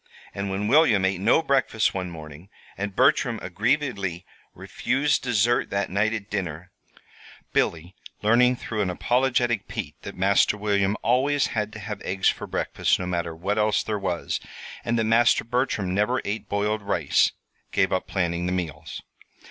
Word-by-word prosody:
And 100 0 -3
when 100 +2 -2
William 115 -8 +4
ate 95 -1 0
no 115 +10 +4
breakfast 135 -7 +1
one 90 -2 -3
morning, 80 +2 -11 0.3
and 100 0 -4
Bertram 135 -6 +3
aggrievedly 100 - -1 0.3
refused 145 +3 0
dessert 120 -1 +1
that 100 -2 -2
night 105 +3 +1
at 110 -3 -4
dinner, 90 -4 -4 0.8
Billy 85 +2 0 0.3
learning 125 +4 +4
through 110 -3 -4
an 95 - 0
apologetic 120 +2 +1
Pete - - -5
that - - -8
Master 100 +2 +3
William 100 -1 +1
always 135 +4 +2
had 105 -1 -1
to 105 - -8
have 105 0 -6
eggs 95 0 +1
for - - -4
breakfast - - 0
no 90 - -4
matter 85 -2 -2
what 100 +6 -1
else 105 0 +2
there 105 -2 -2
was, 90 -3 -2 0.4
and 120 - 0
that 115 - +2
Master 115 +2 +4
Bertram 115 -6 -1
never 105 +6 +1
ate 105 +2 -4
boiled 105 +1 0
rice 90 -7 +2 0.4
gave - - +2
up - - -1
planning 85 -1 -1
the - - -1
meals. 80 -4 -5
105 Hz, 160 wpm, -25 LUFS, 95-120 Hz, 0.8 s, William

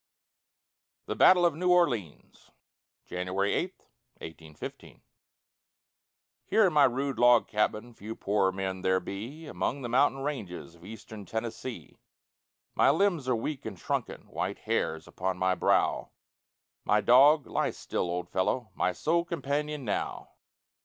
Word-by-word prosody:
THE - - -3
BATTLE 180 -1 +6
OF 170 - +3
NEW 180 +2 +1
ORLEANS 120 - -1 0.6
[January 90 +2 -1
8, 185 +2 -3 0.4
1815] 80 -2 -10 1.4
Here, 215 +2 +3
in 180 - +1
my 145 -2 +6
rude 135 +2 -1
log 120 -1 +5
cabin, 110 +2 -1
Few 110 +1 -8
poorer 100 -1 +1
men 95 -1 -4
there 95 0 +2
be 115 - -7
Among 140 -2 -3
the 120 - -4
mountain 135 +2 +2
ranges 110 - -5
Of 85 0 -19
Eastern 105 0 -10
Tennessee. 115 -4 -6 0.7
My - - +4
limbs 160 -3 +1
are 125 - +3
weak 130 +5 -4
and 105 -4 -6
shrunken, - - -3
White - - -3
hairs 80 0 -2
upon 95 0 -3
my 95 0 +2
brow, 90 - +1 0.7
My 105 - +3
dog 140 +6 +6
lie - - -1
still 90 - -3
old 90 0 -3
fellow! 110 +5 -1
My 90 - 0
sole 170 - +1
companion 150 -3 -3
now. 105 - -3
115 Hz, 135 wpm, -29 LUFS, 95-145 Hz, 1.4 s, BATTLE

